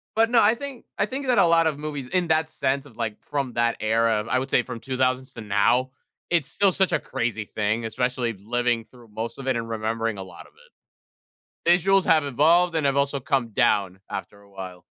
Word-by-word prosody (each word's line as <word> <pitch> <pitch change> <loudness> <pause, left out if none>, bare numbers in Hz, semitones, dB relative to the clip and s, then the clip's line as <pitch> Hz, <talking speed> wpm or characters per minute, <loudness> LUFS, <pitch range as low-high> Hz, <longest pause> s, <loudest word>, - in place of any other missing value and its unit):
But 225 +1 +3
no, 235 - +6
I 215 +3 +4
think 275 0 -8
I - - +2
think 265 +5 -5
that 250 -2 +3
a - - +6
lot 165 -1 +4
of 150 -3 -1
movies 145 -3 -5
in 180 +3 0
that 160 0 +2
sense 140 +1 -1
of 120 -6 -16
like 110 -3 -3
from 140 -3 -1
that 115 0 +1
era, 110 0 +2
I 130 - +2
would 135 +1 -4
say 125 - +3
from 120 -2 -7
2000's 130 +1 -1
to 115 - -8
now, 115 +5 +2 0.4
it's 170 -5 +1
still 200 -2 +2
such 190 +1 +1
a - - +3
crazy 115 -3 -3
thing, 110 +2 -1
especially 125 0 -1
living 120 +1 0
through 120 -3 -18
most 115 +2 -5
of 135 - -7
it 130 -3 +1
and 115 - -4
remembering 115 0 -2
a 95 - -5
lot 95 - -12
of - - -25
it. 485 +2 -23 1.1
Visuals 195 +2 +3
have 155 -2 +4
evolved 165 +6 +3
and 150 -3 +1
have 140 0 +1
also 140 0 +1
come 135 -4 0
down 100 -3 +1
after 100 - -7
a 100 - -21
while. 95 -2 -9
130 Hz, 220 wpm, -24 LUFS, 115-160 Hz, 1.1 s, no